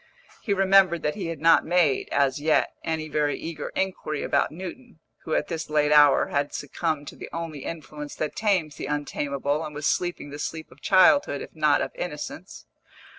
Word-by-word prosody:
He 210 Hz, -, -4 dB
remembered 190 Hz, -3 st, +4 dB
that 150 Hz, -, 0 dB
he 195 Hz, -5 st, -5 dB
had 165 Hz, -3 st, -5 dB
not 165 Hz, +1 st, +5 dB
made, 170 Hz, -6 st, +2 dB
as 140 Hz, 0 st, +1 dB
yet, 155 Hz, +1 st, +2 dB
any 160 Hz, -1 st, -2 dB
very 150 Hz, -1 st, 0 dB
eager 160 Hz, -3 st, -6 dB
inquiry 185 Hz, -6 st, -2 dB
about -, -, +1 dB
Newton, 190 Hz, +7 st, -9 dB, 0.3 s
who 160 Hz, -, -1 dB
at -, -, 0 dB
this 160 Hz, -2 st, -4 dB
late 150 Hz, -1 st, +2 dB
hour 145 Hz, -2 st, +6 dB
had 140 Hz, 0 st, -1 dB
succumbed 145 Hz, 0 st, -3 dB
to -, -, -13 dB
the -, -, -9 dB
only 165 Hz, -3 st, -5 dB
influence 150 Hz, -2 st, -7 dB
that 155 Hz, -, -3 dB
tames 185 Hz, -9 st, 0 dB
the -, -, -5 dB
untamable 145 Hz, 0 st, -2 dB
and 150 Hz, -, -7 dB
was 150 Hz, 0 st, -4 dB
sleeping 175 Hz, -5 st, -1 dB
the 145 Hz, -, -8 dB
sleep 160 Hz, +1 st, -5 dB
of 135 Hz, -, -18 dB
childhood, 195 Hz, -, +4 dB
if -, -, -13 dB
not -, -, +3 dB
of -, -, -5 dB
innocence. -, -, -7 dB
155 Hz, 185 wpm, -25 LUFS, 145-175 Hz, 0.3 s, hour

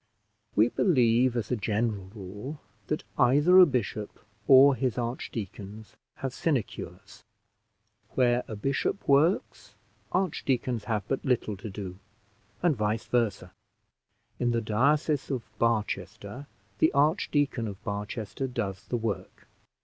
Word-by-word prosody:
We 110 Hz, +3 st, +5 dB
believe, 125 Hz, -, +3 dB
as 115 Hz, 0 st, -3 dB
a -, -, +3 dB
general 105 Hz, -2 st, -1 dB
rule, 105 Hz, +9 st, -7 dB, 0.3 s
that 150 Hz, -, -2 dB, 0.2 s
either 145 Hz, +9 st, +6 dB
a 180 Hz, -, +9 dB
bishop 110 Hz, -6 st, -3 dB, 0.3 s
or 135 Hz, +1 st, +8 dB
his 130 Hz, -1 st, -1 dB
archdeacons 110 Hz, -3 st, -5 dB, 0.2 s
have 135 Hz, -2 st, -4 dB
sinecures: 140 Hz, -8 st, -3 dB, 0.9 s
where 125 Hz, -1 st, +3 dB
a 110 Hz, -, -5 dB
bishop 135 Hz, -, -2 dB
works, 150 Hz, +7 st, +2 dB, 0.4 s
archdeacons 130 Hz, -, -1 dB
have 105 Hz, -2 st, -2 dB
but 135 Hz, -, -2 dB
little 125 Hz, -6 st, 0 dB
to 105 Hz, +3 st, -7 dB
do, 95 Hz, -2 st, -7 dB, 0.6 s
and 170 Hz, -4 st, +3 dB
vice 105 Hz, 0 st, -1 dB
versa. 120 Hz, -4 st, -1 dB, 0.9 s
In 120 Hz, -, +1 dB
the 115 Hz, -1 st, +1 dB
diocese 140 Hz, +7 st, +1 dB
of 130 Hz, -4 st, -2 dB, 0.2 s
Barchester 110 Hz, +2 st, -2 dB, 0.3 s
the 160 Hz, -, +4 dB
Archdeacon 145 Hz, -, +1 dB
of 100 Hz, -2 st, -8 dB
Barchester 105 Hz, +4 st, -4 dB
does 105 Hz, -7 st, -4 dB
the 120 Hz, -, -1 dB
work. 105 Hz, -5 st, -5 dB
120 Hz, 120 wpm, -28 LUFS, 105-135 Hz, 0.9 s, a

